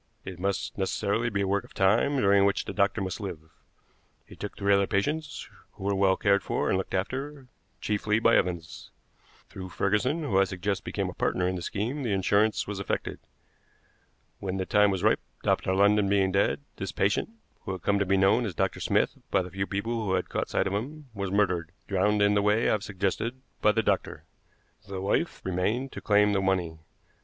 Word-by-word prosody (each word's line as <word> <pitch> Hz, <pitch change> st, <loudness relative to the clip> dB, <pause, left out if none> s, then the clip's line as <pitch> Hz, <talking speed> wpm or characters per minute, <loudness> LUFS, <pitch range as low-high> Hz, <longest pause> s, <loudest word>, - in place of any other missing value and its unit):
It 95 Hz, -2 st, -7 dB
must 100 Hz, +1 st, -2 dB
necessarily 100 Hz, +4 st, 0 dB
be 100 Hz, -3 st, -1 dB
a 100 Hz, -, 0 dB
work 100 Hz, +1 st, +1 dB
of -, -, -17 dB
time, 110 Hz, +9 st, +3 dB
during 100 Hz, -4 st, +4 dB
which 100 Hz, 0 st, +1 dB
the -, -, -5 dB
doctor 100 Hz, +1 st, +1 dB
must 95 Hz, +1 st, -4 dB
live. 95 Hz, -5 st, -4 dB, 0.9 s
He -, -, -14 dB
took 105 Hz, -, -7 dB
three 100 Hz, 0 st, +2 dB
other 100 Hz, 0 st, +3 dB
patients, 150 Hz, +10 st, -2 dB, 0.3 s
who -, -, -12 dB
were 100 Hz, +1 st, +1 dB
well 95 Hz, -1 st, +3 dB
cared 100 Hz, -1 st, +3 dB
for -, -, -1 dB
and -, -, +2 dB
looked 95 Hz, -, -4 dB
after, 135 Hz, +8 st, -3 dB, 0.4 s
chiefly 105 Hz, 0 st, 0 dB
by 115 Hz, +1 st, +4 dB
Evans. 85 Hz, -3 st, -2 dB, 0.6 s
Through 95 Hz, -1 st, -8 dB
Ferguson, 125 Hz, -, 0 dB
who 100 Hz, -10 st, +2 dB
I 95 Hz, -, +5 dB
suggest 95 Hz, +1 st, -3 dB
became -, -, -2 dB
a -, -, -5 dB
partner 90 Hz, 0 st, 0 dB
in 95 Hz, -, -1 dB
the 90 Hz, -, -4 dB
scheme, 115 Hz, +11 st, -3 dB
the 115 Hz, -6 st, -1 dB
insurance 100 Hz, +3 st, +2 dB
was 100 Hz, -1 st, -5 dB
effected. 100 Hz, -, -3 dB, 1.2 s
When 95 Hz, -1 st, -3 dB
the 95 Hz, -, -2 dB
time 105 Hz, +1 st, +4 dB
was 95 Hz, -1 st, -2 dB
ripe, 110 Hz, -, +4 dB, 0.2 s
Dr. -, -, +1 dB
London 100 Hz, 0 st, +4 dB
being 100 Hz, -1 st, +2 dB
dead, 100 Hz, +8 st, +1 dB, 0.2 s
this 95 Hz, -, -4 dB
patient, 100 Hz, -, 0 dB, 0.4 s
who -, -, -3 dB
had 95 Hz, -, -7 dB
come 100 Hz, -1 st, +2 dB
to -, -, +3 dB
be 95 Hz, +1 st, +3 dB
known 100 Hz, +5 st, +4 dB
as 90 Hz, -, -6 dB
Dr. -, -, -1 dB
Smith -, -, +1 dB
by -, -, +2 dB
the 90 Hz, -, -9 dB
few 95 Hz, +1 st, -2 dB
people 115 Hz, +3 st, -2 dB
who 95 Hz, -, 0 dB
had -, -, -2 dB
caught -, -, -2 dB
sight -, -, +1 dB
of 95 Hz, -, -2 dB
him, 140 Hz, +7 st, -5 dB
was 100 Hz, -2 st, -3 dB
murdered, 90 Hz, -5 st, 0 dB
drowned, 105 Hz, +2 st, +2 dB
in 100 Hz, 0 st, +4 dB
the 100 Hz, -, +3 dB
way 105 Hz, +3 st, +2 dB
I -, -, +3 dB
have 105 Hz, -2 st, 0 dB
suggested, 105 Hz, +5 st, -2 dB, 0.2 s
by 105 Hz, -, +5 dB
the 115 Hz, +1 st, 0 dB
doctor. -, -, -1 dB, 0.6 s
The 95 Hz, -1 st, -5 dB
wife 100 Hz, -, -1 dB
remained 105 Hz, +9 st, -1 dB
to -, -, -8 dB
claim 105 Hz, 0 st, +3 dB
the 100 Hz, -, +1 dB
money. 90 Hz, -4 st, 0 dB
100 Hz, 205 wpm, -27 LUFS, 95-105 Hz, 1.2 s, I